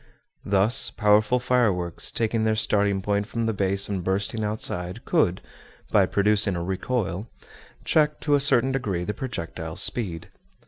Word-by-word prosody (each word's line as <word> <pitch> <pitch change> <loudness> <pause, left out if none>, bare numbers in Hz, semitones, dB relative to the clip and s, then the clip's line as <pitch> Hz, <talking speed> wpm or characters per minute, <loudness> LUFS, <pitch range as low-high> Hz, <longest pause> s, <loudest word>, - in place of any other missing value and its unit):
Thus, 100 +4 +2
powerful 105 +2 +3
fireworks, 115 -9 0
taking 115 0 0
their 110 0 +1
starting 100 -3 +1
point 100 0 -1
from 115 0 -3
the 115 - 0
base 100 0 +1
and 95 -3 -3
bursting 100 +4 -1
outside, 105 -1 -3
could, 120 - +1 0.5
by - - +4
producing 105 -1 +2
a 85 - -3
recoil, 95 +1 -2 0.6
check 150 -1 +2
to 145 - 0
a 145 - +5
certain 135 -2 +3
degree 100 -10 -2
the 105 - -3
projectile's 85 -9 -4
speed. 90 -9 -1
105 Hz, 145 wpm, -24 LUFS, 95-120 Hz, 0.6 s, a